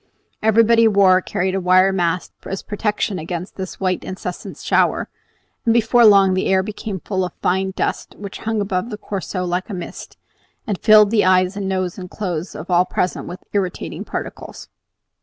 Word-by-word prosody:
Everybody 225 +1 +5
wore 195 -3 +5
or - - 0
carried 185 +1 -2
a 195 - 0
wire 185 +1 +4
mask 175 -1 -1
as 195 - -4
protection 210 -1 -2
against 170 +3 -6
this 190 -1 -7
white, 185 -2 -1
incessant 185 -1 -6
shower; - - +1 0.5
and 230 0 +2
before 235 +1 +4
long 195 -3 +6
the 185 - 0
air 190 0 +3
became 205 -1 -5
full 190 +1 -2
of 180 - -4
a - - -45
fine 190 +1 +1
dust - - -3
which 200 -1 -8
hung 220 -1 -1
above 195 +2 -2
the 210 - -5
Corso 190 -3 -4
like 180 +4 -2
a 200 - -4
mist, 175 - -8 0.5
and 205 -6 -3
filled 215 -1 +6
the 220 -2 +3
eyes 185 +1 +3
and 200 -1 -3
noses 185 -1 -2
and 180 -1 -8
clothes 180 -4 -4
of 165 +4 -7
all 175 +1 +4
present 180 - -2
with 180 - -8
irritating 190 -3 -3
particles. - - -7
190 Hz, 185 wpm, -20 LUFS, 185-210 Hz, 0.5 s, long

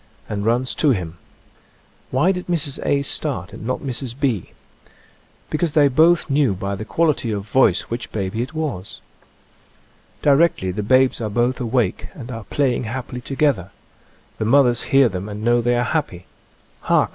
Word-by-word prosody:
and 105 0 -3
runs 125 +3 +1
to 150 - +2
him. 90 -8 -2 0.9
Why 140 +9 +2
did 180 -1 -5
Mrs. 155 -6 -1
A. 140 0 +1
start 135 - -2
and 110 - -8
not 130 - -2
Mrs. 130 -2 -4
B.? 125 - -1 1.0
Because 155 0 0
they 145 -2 +5
both 160 +5 +4
knew 140 -8 +2
by 100 +2 -3
the 100 +2 -5
quality 155 -4 +1
of 105 -2 -2
voice 110 -5 +3
which 115 +1 -6
baby 105 +2 -2
it 130 +6 -5
was. 140 - -4 1.2
Di 145 - +5
rectly 140 - +2
the 105 - -1
babes 130 +4 +3
are 110 - -2
both 120 +5 0
awake 120 -5 0
and 125 -3 -8
are 115 -3 -7
play 135 +1 +1
ing - - -3
happily 125 +1 -5
together. 135 - 0 0.7
The 110 - -1
mothers 125 0 +4
hear 135 -1 +5
them 95 -1 -5
and 105 +1 -6
know 120 +1 +3
they 120 +1 +1
are 120 - +1
happy. 125 - -2 0.5
Hark! - - +2
125 Hz, 170 wpm, -21 LUFS, 110-140 Hz, 1.2 s, they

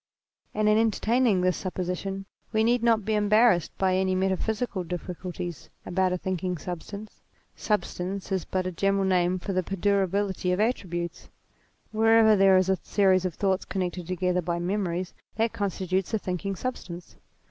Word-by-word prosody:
And 215 0 +2
in 215 +1 +5
entertaining 225 -1 +2
this 180 -1 +1
supposition 185 +1 -4 0.3
we 220 0 +2
need 240 +1 +3
not 225 -3 +3
be 220 - 0
embarrassed 210 -3 +4
by 185 -1 +2
any 190 0 +1
metaphysical 190 +2 -1
difficul 180 +1 -5
ties 175 -2 -6 0.2
about 185 0 +1
a 180 - 0
thinking 180 0 -2
substance. 200 +6 -8 0.3
Substance 195 -2 -2
is 190 -3 0
but 185 -1 -2
a 185 - -2
general 195 +2 +1
name 180 -1 +2
for 195 +2 -4
the 185 - +2
perdurability 195 0 0
of 180 - 0
attributes: 175 -7 -2 0.6
wherever 220 0 +5
there 195 -1 +6
is 185 0 +2
a 190 -2 +1
series 190 -2 +2
of 180 -4 -2
thoughts 190 -2 0
connected 180 -2 -3
together 180 0 0
by 170 0 -2
memories, 180 0 -2 0.2
that 225 +1 0
constitutes 190 0 -1
a - - +3
thinking 195 0 -3
substance. 180 -7 -6
190 Hz, 160 wpm, -27 LUFS, 180-210 Hz, 0.6 s, there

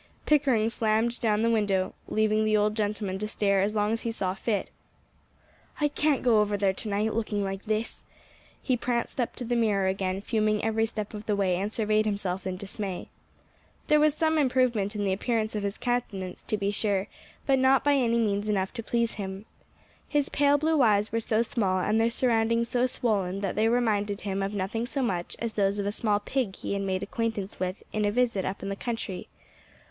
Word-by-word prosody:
Pickering 270 -7 +3
slammed 225 +1 +1
down 215 -2 +2
the 230 - +3
window, 200 -4 +1
leaving 215 0 +2
the 215 0 +3
old 210 0 +2
gentleman 205 -3 -2
to 210 - -2
stare 200 -2 +1
as 210 +2 0
long 210 0 +1
as 225 - -1
he 230 - -2
saw 190 -5 -2
fit. 205 +1 -2 1.1
"I 295 -1 +2
can't 295 -1 +1
go 230 -4 +5
over 205 -1 0
there 195 -1 +2
to 215 - -6
night, 210 +2 0
looking 210 -2 -1
like 195 +1 -4
this." 215 +1 -2 0.6
He 255 - 0
pranced 240 +1 -1
up 240 - -2
to 245 - -6
the 240 +1 0
mirror 210 -4 +2
again, 190 0 -1
fuming 215 -1 0
every 225 0 +1
step 215 -1 -5
of 210 0 -8
the 210 - +2
way, 190 -3 +1
and 200 +3 -2
surveyed 215 -1 +1
himself 195 -2 -2
in 185 -1 -3
dismay. 195 -1 -5 0.8
There 300 - +6
was 305 -1 +4
some 320 -1 +2
improvement 250 -7 +1
in 205 - -1
the 195 -1 +1
appearance 220 +2 -1
of 210 - -2
his 200 0 -3
countenance, 205 -7 -2
to 215 - 0
be 200 0 0
sure, 200 -2 0 0.4
but 270 -1 +3
not 265 +1 +4
by 290 - +4
any 240 -4 +2
means 210 -2 0
enough 190 -2 0
to 230 - -4
please 235 0 0
him. 190 +1 -6 0.6
His 290 -2 +1
pale 285 0 +3
blue 310 0 +2
eyes 210 -3 +3
were 230 - +1
so 225 0 +1
small, 200 -5 0
and 215 +4 +2
their 230 - +3
surroundings 230 -1 +1
so 250 +1 +2
swollen, 200 -6 -1
that 195 -3 -1
they 220 +1 +2
reminded 210 -4 +1
him 195 -1 -2
of 195 +1 -2
nothing 215 +5 -2
so 270 +1 -1
much 180 -7 -2
as 230 -1 -3
those 200 -1 +1
of 200 - -2
a 205 - 0
small 210 -1 +1
pig 210 -2 -2
he - - -4
had 200 - -1
made 190 -1 -1
acquaintance 215 -3 -3
with 185 +1 -3
in 215 - 0
a 205 - +3
visit 230 -4 +1
up 195 - -4
in 195 - -3
the 195 - -2
country. 225 -4 -4
215 Hz, 210 wpm, -27 LUFS, 200-235 Hz, 1.1 s, There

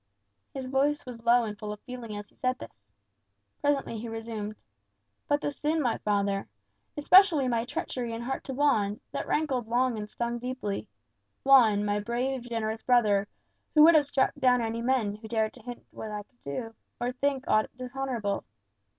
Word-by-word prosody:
His 270 -1 -5
voice 275 +3 +1
was 240 -3 -9
low 240 +1 +5
and 210 -2 -4
full 210 -1 -5
of 210 - -7
feeling 240 -4 -7
as 205 0 -8
he - - -29
said 255 0 -1
this. 100 - -13 0.7
Presently 275 -6 0
he 230 +1 -6
resumed. 225 -2 -5 0.7
"But 290 -1 +2
the - - -1
sin, 300 +3 -1
my 245 -6 0
father! 200 -1 0 0.5
Especially 315 -2 +6
my 235 -2 0
treachery 245 -1 -4
in 230 +1 -4
heart 265 +2 -3
to 265 - -4
Juan; 220 -8 +2
that - - -4
rankled 270 -7 0
long 240 0 +1
and 210 0 -6
stung 235 +1 -3
deeply. 240 - -4 0.6
Juan, 230 -7 +6
my 205 0 +1
brave, 245 +5 -2
generous 225 -1 -2
brother, 210 -5 +3 0.5
who 305 - +8
would 335 +2 +9
have 300 -3 +5
struck 275 -2 +2
down 255 -4 +3
any 230 0 -2
man 235 -5 +1
who 220 +1 -10
dared 220 -1 0
to - - -14
hint 245 -1 -9
that 220 - -6
I 210 -1 -4
could 245 +4 -40
do, 225 - -4 0.3
or 245 +1 -1
think, 275 +1 -1
aught 215 0 +3
dishonourable! 250 -5 -3
240 Hz, 180 wpm, -28 LUFS, 215-265 Hz, 0.7 s, would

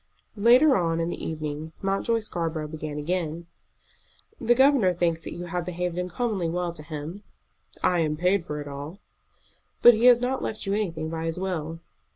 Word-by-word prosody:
Later 245 +7 +6
on 165 -3 +1
in 165 0 -1
the - - -5
evening 155 0 -4
Mountjoy 195 +4 +1
Scarborough 165 -6 -3
began 155 -1 -6
again. 170 +1 -2 0.9
"The 240 - +3
governor 265 -8 +5
thinks 170 -2 0
that - - -6
you 175 - -6
have 175 0 -3
behaved 180 0 -3
uncommonly 180 0 -1
well 175 0 -2
to 160 - -8
him." 155 +5 -7 0.6
"I 180 - +3
am 155 -2 0
paid 180 +2 +2
for 150 -2 -5
it 145 - -6
all." 145 +5 -7 0.9
"But 240 - +10
he 225 +2 +1
has 245 -1 +8
not 255 +2 -1
left 215 -1 -4
you 195 - 0
anything 165 -7 -2
by 165 0 -3
his 165 0 -2
will." 165 -3 -3
175 Hz, 180 wpm, -26 LUFS, 160-200 Hz, 0.9 s, But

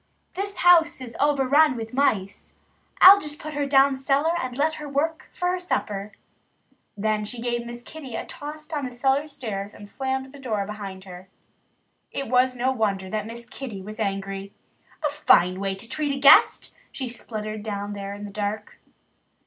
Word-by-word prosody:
"This 400 +1 -4
house 335 -3 +6
is 245 -3 -8
overrun 285 0 +4
with 225 0 -6
mice. 210 -8 -1 0.5
I'll 395 +2 +11
just 300 0 -4
put 310 0 -7
her 285 -1 -1
down 275 0 +5
cellar 275 +4 +1
and 255 -1 -5
let 310 +2 +2
her 295 - -6
work 315 +4 -1
for 355 - -1
her 365 0 -1
supper." 210 - -3 0.8
Then 215 +1 0
she 235 +3 -6
gave 240 0 -2
Miss 240 0 -8
Kitty 270 -4 -9
a - - -4
toss 305 +1 -8
down 295 -4 -3
the 250 - -5
cellar 270 +4 +1
stairs 215 -8 -6
and 205 - -11
slammed 265 +3 -3
the 285 - -12
door 215 -7 -2
behind 195 -2 -7
her. 185 0 -11 0.8
It 275 - -4
was 255 +1 +3
no 250 +2 +1
wonder 200 -6 -1
that 215 -1 -2
Miss 235 +1 -9
Kitty 260 -3 -7
Cat 190 - -9
was 215 +2 -8
angry. 195 -1 -3 0.5
"A - - +3
fine 180 -9 +4
way 195 -1 -2
to 195 +4 -9
treat 290 +1 -2
a - - -5
guest!" 275 0 +6 0.2
she 260 - -4
spluttered 215 -3 -6
down 205 -1 -4
there 200 0 -6
in 205 - -9
the 205 - -8
dark. 210 +1 -4
245 Hz, 185 wpm, -24 LUFS, 205-280 Hz, 0.8 s, I'll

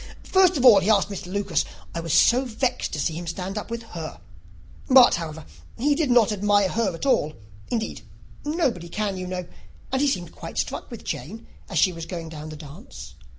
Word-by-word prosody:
First 370 -3 +4
of 260 - +1
all, 220 -6 +9
he 195 - -1
asked 205 -1 +3
Miss 195 -2 -6
Lucas. 195 0 0 0.3
I 170 - -3
was 165 -1 -4
so 245 - +5
vexed 250 0 -2
to 155 - -2
see 150 +3 0
him 170 +2 -6
stand 185 +4 -4
up 210 - -5
with 235 0 -4
her; 160 - -6 0.7
but, 255 -2 +8
however, 160 - -4 0.3
he 290 +4 +2
did 295 -1 0
not 240 -3 +5
admire 205 -1 +2
her 210 -5 0
at 165 - -5
all; 155 - +2 0.4
indeed, 225 -2 -3 0.4
nobody 275 - -1
can, 205 +2 -2
you 185 0 -5
know; 180 -1 -4 0.5
and 265 +1 +1
he 290 - +3
seemed 180 - -1
quite - - -9
struck - - -3
with - - -9
Jane 220 +8 -6 0.2
as - - -3
she 185 - +4
was 165 -1 -7
going 170 -3 -6
down 155 -1 -8
the 155 - -7
dance. 150 -1 -11
200 Hz, 205 wpm, -24 LUFS, 170-240 Hz, 0.7 s, all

